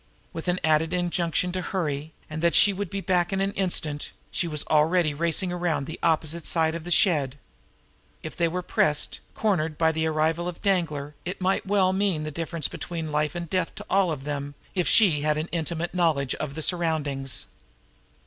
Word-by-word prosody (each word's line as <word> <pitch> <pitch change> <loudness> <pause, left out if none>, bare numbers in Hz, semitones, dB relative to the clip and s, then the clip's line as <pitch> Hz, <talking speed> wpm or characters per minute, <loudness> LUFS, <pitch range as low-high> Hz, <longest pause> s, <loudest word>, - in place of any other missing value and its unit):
With 165 +1 -6
an 180 +1 +1
added 160 +1 +2
injunction 175 -1 0
to 185 +1 -2
hurry 155 -5 -3 0.2
and 155 0 -5
that 170 -1 +2
she 205 - +7
would 195 -1 -4
be 195 +2 -3
back 180 -2 +1
in 195 - 0
an 195 +1 +1
instant, 160 -6 -1 0.2
she 175 - -1
was 150 -3 -3
already 155 +1 +3
racing 170 +4 0
around 175 -5 -1
the 160 - -7
opposite 160 0 +1
side 160 -1 +2
of 170 -1 -6
the - - -5
shed. 145 -8 +3 0.9
If 155 - -6
they 170 - +2
were 180 +2 -3
pressed, 150 -3 +1 0.2
cornered, 165 -8 0
by 160 -1 +3
the 160 0 0
arrival 160 +2 0
of 180 - -5
Danglar, 160 -7 0
it 180 +3 -5
might 190 +1 0
well 190 -2 +3
mean 190 -5 +1
the 155 - -4
difference 165 -1 -2
between 165 -3 -5
life 150 +1 0
and 170 -1 -4
death 185 0 -1
to - - -8
all 190 -3 +3
of 140 -4 -4
them 145 0 -4 0.2
if 180 -3 0
she 180 -10 +5
had 150 0 +1
an 155 +2 -3
intimate 170 0 -2
knowledge 160 -7 +1
of 140 -2 -5
the 160 - -3
surroundings. 150 -7 0
165 Hz, 195 wpm, -26 LUFS, 155-180 Hz, 0.9 s, she